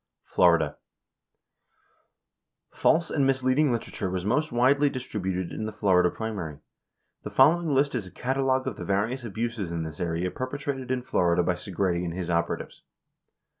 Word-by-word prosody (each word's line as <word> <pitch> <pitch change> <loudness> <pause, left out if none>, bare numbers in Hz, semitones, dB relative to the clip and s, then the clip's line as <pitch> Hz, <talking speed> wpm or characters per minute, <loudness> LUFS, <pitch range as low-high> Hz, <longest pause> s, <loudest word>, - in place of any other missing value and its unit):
61 - - -26
Florida: 85 -4 +4 1.9
False 165 +1 +2
and 140 -3 +2
misleading 135 +2 +2
literature 115 -4 -3
was 90 0 -3
most 150 +8 +1
widely 135 +4 +4
dis 130 -1 -5
tributed 95 -4 -3
in 110 - -4
the - - -4
Florida 95 -4 +3
primary. 95 -10 -5 0.6
The - - -6
following 170 +1 +4
list 140 0 +2
is 95 - -3
a - - -12
catalog 130 0 0
of 130 -6 -4
the - - -6
various 110 +6 -1
abuses 115 -3 -3
in 85 -1 -2
this 80 -2 -7
area 85 +1 -1
perpetrated 135 0 -4
in 130 -1 -1
Florida 90 -6 +2
by 90 - +1
Segretti 90 -1 -1
and 85 -1 -4
his 90 -2 -3
operatives. 85 0 -2
110 Hz, 160 wpm, -27 LUFS, 90-130 Hz, 1.9 s, Florida